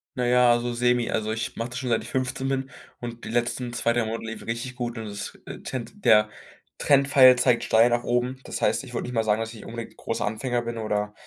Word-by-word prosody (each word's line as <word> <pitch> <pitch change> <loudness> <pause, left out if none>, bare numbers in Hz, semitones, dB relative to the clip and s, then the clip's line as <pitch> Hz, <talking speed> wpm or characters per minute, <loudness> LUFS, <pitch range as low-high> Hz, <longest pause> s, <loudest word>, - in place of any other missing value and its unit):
Na 125 - -1
ja, 125 0 +5
also 120 0 +1
semi. 120 0 +1
Also, 110 0 -1
ich 110 +1 -3
mache 115 +1 -4
das 125 0 -5
schon, 130 -1 -3
seit 115 -1 +2
ich 115 - -9
15 130 0 -2
bin 135 0 -2 0.3
und 120 -1 -7
die - - -6
letzten 120 +1 -1
2, 115 -1 +1
3 120 -1 +1
Monate 115 +1 -4
liefen 110 0 -7
richtig 115 +3 -4
gut 120 -2 -4
und 110 - -5
das 100 -1 -7 0.3
tend 130 - -6
der 105 -1 +6 0.5
Trendpfeil 135 -2 +6
zeigt 125 -1 +3
steil 115 +2 +5
nach 120 0 0
oben. 125 +2 -1
Das - - -6
heißt, - - +1
ich 125 -2 -11
würde - - -2
nicht 125 - -6
mal 115 -1 +1
sagen, 110 0 +1
dass 115 0 -4
ich 110 - -11
unbedingt 115 0 -7
'n - - -34
großer 115 - -3
Anfänger 120 +3 -1
bin 115 0 -5
oder 105 -1 -2
120 Hz, 245 wpm, -25 LUFS, 115-125 Hz, 0.5 s, der